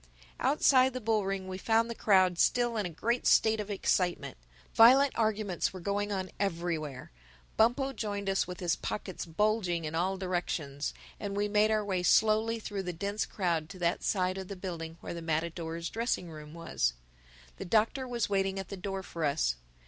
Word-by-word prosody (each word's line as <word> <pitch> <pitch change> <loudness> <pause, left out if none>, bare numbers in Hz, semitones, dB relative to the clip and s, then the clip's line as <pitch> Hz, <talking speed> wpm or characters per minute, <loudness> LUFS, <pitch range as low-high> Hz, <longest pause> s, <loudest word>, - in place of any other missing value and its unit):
Outside 265 -3 +4
the 255 - -3
bull 220 -3 +1
ring 195 -1 -3
we 185 0 -5
found 225 +3 +2
the 235 - -4
crowd 185 -5 +3
still 240 -1 +2
in 210 -4 -1
a - - -6
great 235 +9 -1
state 220 0 +4
of 210 0 -4
excitement. 185 -3 0 0.4
Violent 260 +5 +7
arguments 215 -5 0
were 185 - -7
going 205 +3 -1
on 190 -2 -3
everywhere. 165 - -3 0.4
Bumpo 265 +5 +2
joined 205 -4 -4
us 195 0 +1
with 180 +1 -7
his 175 -2 +1
pockets 185 -4 -5
bulging 180 -2 0
in 155 - -4
all 185 +4 0
directions; 170 -6 -3 0.2
and 200 -1 -4
we 205 0 +1
made 210 +1 +3
our 215 -1 +1
way 190 -3 -1
slowly 220 +4 +3
through 205 -2 -4
the 180 -1 -4
dense 200 +5 -2
crowd 170 -5 -1
to 195 - -9
that 175 0 0
side 185 -1 0
of 190 - -6
the 200 - -6
building 170 -3 -6
where - - -6
the 170 - -6
matadors' 165 +1 -2
dressing 225 -7 -2
room 155 0 -10
was. 115 - -1 0.6
The - - -6
Doctor 225 +7 +1
was 240 -2 -1
waiting 195 -1 0
at 195 -2 -5
the 200 - -6
door 195 +1 -4
for 170 -2 -6
us. 140 - +1
195 Hz, 185 wpm, -30 LUFS, 170-215 Hz, 0.6 s, Violent